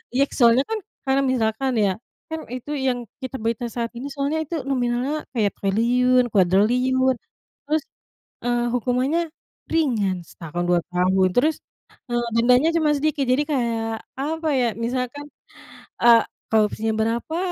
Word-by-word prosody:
Iya, 275 - +4
soalnya 240 +1 +4
kan, 445 -1 -1 0.3
karena 270 0 +2
misalkan 240 +2 0
ya, 195 - +2 0.4
kan 320 0 -3
itu 255 +4 -6
yang 255 -3 -1 0.2
kita 260 0 -5
berita 230 +1 -1
saat 230 0 -3
ini 250 +4 -6
soalnya 285 +3 -1
itu 335 - -5
nominalnya 255 +3 -1
kayak 210 -5 +1
triliun, 245 +5 +3
kuadriliun. 245 +8 +3 0.6
Terus, 310 -1 +1 0.6
eee, 240 0 +1
hukumannya 255 +6 +1 0.5
ringan, 215 - +1
setahun, 165 +1 -6
2 175 -1 +4
tahun, 185 +1 +3
terus, 300 +8 +3 0.5
eee, 240 0 -1
dendanya 250 +6 +4
cuma 300 -2 +2
sedikit. 295 -1 0
Jadi 260 +4 +3
kayak, 225 -4 -1 0.2
apa 315 +4 -2
ya, 250 - +2 0.2
misalkan, 255 +4 -3 0.7
eee, 235 -1 +7 0.3
korupsinya 220 0 +2
berapa, 230 +8 -1
250 Hz, 135 wpm, -23 LUFS, 225-275 Hz, 0.7 s, eee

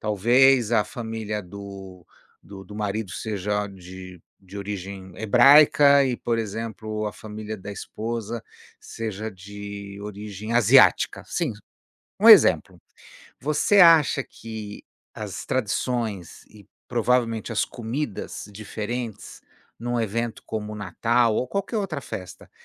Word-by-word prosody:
talvez 120 +3 +4
a 110 - +4
família 110 -3 -5
do 95 -1 -10 0.4
do 95 -1 -11
do 105 - -12
marido 105 -1 -3
seja 105 -1 -2
de 90 -1 -11 0.2
de 95 +1 -12
origem 95 -1 -6
hebraica 140 +5 +6
e, 125 -2 -1
por 115 -1 -1
exemplo, 110 0 -4
a 105 - -4
família 110 0 -7
da 100 +1 -8
esposa 115 +2 -5 0.4
seja 110 -1 -5
de 100 +1 -9
origem 105 +1 -7
asiática, 120 -4 +5
sim, 160 -9 -2 0.7
um - - +7
exemplo. - - +7 0.6
Você 155 +8 +3
acha 165 -5 +6
que 110 -2 -9 0.3
as - - -6
tradições 110 -5 -2
e, 105 -3 -17 0.2
provavelmente, 120 -1 0
as 105 - +1
comidas 115 -3 -5
diferentes 110 +2 -6 0.4
num 120 +1 -2
evento 115 +1 -3
como 105 -1 -4
o - - -7
Natal 115 +4 +1
ou 125 - 0
qualquer 200 - -3
outra 185 -8 -2
festa, 90 -8 -9
110 Hz, 120 wpm, -24 LUFS, 100-120 Hz, 0.7 s, um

